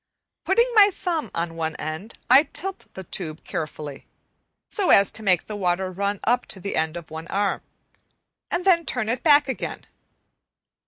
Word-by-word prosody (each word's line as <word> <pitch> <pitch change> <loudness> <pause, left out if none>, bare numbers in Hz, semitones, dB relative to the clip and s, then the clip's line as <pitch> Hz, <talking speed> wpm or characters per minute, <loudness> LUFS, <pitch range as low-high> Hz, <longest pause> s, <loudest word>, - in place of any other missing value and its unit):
Putting 470 +5 +4
my 415 -2 +8
thumb 340 -4 -3
on 170 0 -2
one 160 -1 -2
end 160 +8 -6
I 275 - +8
tilt 380 +6 -5
the 190 - -7
tube 160 -3 -5
carefully, 150 -2 -6 0.6
so 400 -4 0
as 200 0 +6
to - - -6
make 185 -5 +2
the 215 - -6
water 185 -1 0
run 200 +2 -2
up 245 +2 +1
to 190 - -5
the 200 +2 -4
end 160 +1 0
of 165 -2 -10
one 160 +1 -7
arm, 200 +1 0 0.9
and 355 - -2
then 345 -3 +5
turn 245 -8 -2
it 240 +2 -1
back 290 -2 +5
again. 265 - -4
200 Hz, 170 wpm, -24 LUFS, -, 0.9 s, my